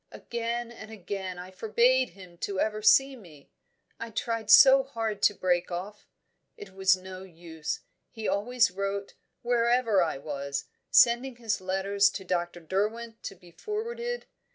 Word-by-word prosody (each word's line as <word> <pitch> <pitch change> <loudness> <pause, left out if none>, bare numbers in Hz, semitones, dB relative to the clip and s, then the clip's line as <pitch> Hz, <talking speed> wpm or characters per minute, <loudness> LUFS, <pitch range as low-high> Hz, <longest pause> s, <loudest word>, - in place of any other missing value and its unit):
Again 235 0 -4
and 220 -2 -11
again 195 -3 -6
I 180 +1 -9
forbade 235 +6 +2
him 175 -2 -15 0.2
ever 215 0 -1
to 215 - -1
see 270 0 +5
me; 165 - -16 0.5
I 230 - -6
tried 225 -1 -3
so 270 +4 +9
hard 225 -6 -4
to 205 - +4
break 175 -2 0
off! 185 +4 -7 0.5
It 200 -2 -11
was 190 0 +3
no 185 0 -10
use. 165 -4 -6 0.3
He 220 -1 -6
always 230 +1 +1
wrote, 200 +1 -4 0.3
wherever 235 -3 +2
I 165 -5 -1
was, 140 -1 -4 0.2
sending 240 +2 +4
his 225 -4 -2
letters 195 +2 +2
to 190 - -11
Dr. 175 -1 -3
Derwent 220 +6 -3
to - - -7
be 175 -1 -18
forwarded. 470 - -5
205 Hz, 150 wpm, -28 LUFS, 185-235 Hz, 0.5 s, so